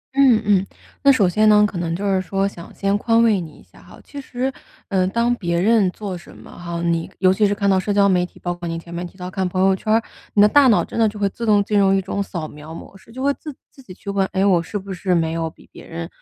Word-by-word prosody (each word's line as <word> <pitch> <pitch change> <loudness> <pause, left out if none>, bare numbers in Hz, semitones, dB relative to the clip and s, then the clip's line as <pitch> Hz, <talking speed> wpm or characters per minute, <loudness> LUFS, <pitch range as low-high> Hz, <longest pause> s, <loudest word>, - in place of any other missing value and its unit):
嗯 260 -5 +5
嗯， 195 -2 +2 0.3
那 280 - +6
首 215 -8 +3
先 215 +4 +3
呢， 210 0 +6
可 185 -4 -6
能 165 -1 -2
就 200 - -4
是 190 -2 +1
说 195 +1 -1
想 170 -4 -10
先 200 0 0
宽 230 +1 +3
慰 215 -5 +3
你 155 -3 -9
一 - - -18
下 - - -21
哈， - - -16
其 285 -1 -9
实 260 +1 -3 0.4
嗯 185 -2 +1
当 235 +3 +1
别 170 -5 -2
人 210 -1 +3
做 195 -1 -6
什 175 - -13
么 - - -14
哈， 170 -1 -6
你 170 -1 -1
尤 185 0 +4
其 210 +2 +2
是 205 - 0
看 200 -1 -1
到 190 -1 +3
社 205 - -2
交 200 0 +4
媒 180 -2 +2
体， 180 - -9
包 175 -1 -3
括 175 0 -7
您 165 0 -3
前 170 +1 -12
面 175 +1 -4
提 190 - -19
到 180 0 -7
看 190 -1 -1
朋 185 +1 -3
友 195 - +4
圈 215 +3 -3
儿， 225 +1 +3 0.3
你 205 - +5
的 210 - +8
大 280 +4 +5
脑 220 - +3
真 - - -6
的 220 -2 +4
就 210 - -10
会 200 - +2
自 230 +3 -6
动 205 -1 +4
进 205 0 +1
入 195 -1 +4
一 - - +2
种 200 +1 -3
扫 170 -5 -5
描 150 +2 -11
模 195 - -11
式， 195 - -17
就 260 +3 -6
会 280 - +2
自 300 -1 -10 0.2
自 270 - -17
己 250 - -14
去 200 - -7
问： 200 -1 +1
“诶 190 +1 +1
我 180 -4 +4
是 190 +5 -5
不 195 -1 -7
是 180 0 0
没 165 -1 0
有 165 0 -2
比 - - -20
别 - - -13
人 165 0 -6
195 Hz, 320 characters per minute, -20 LUFS, 175-215 Hz, 0.4 s, 的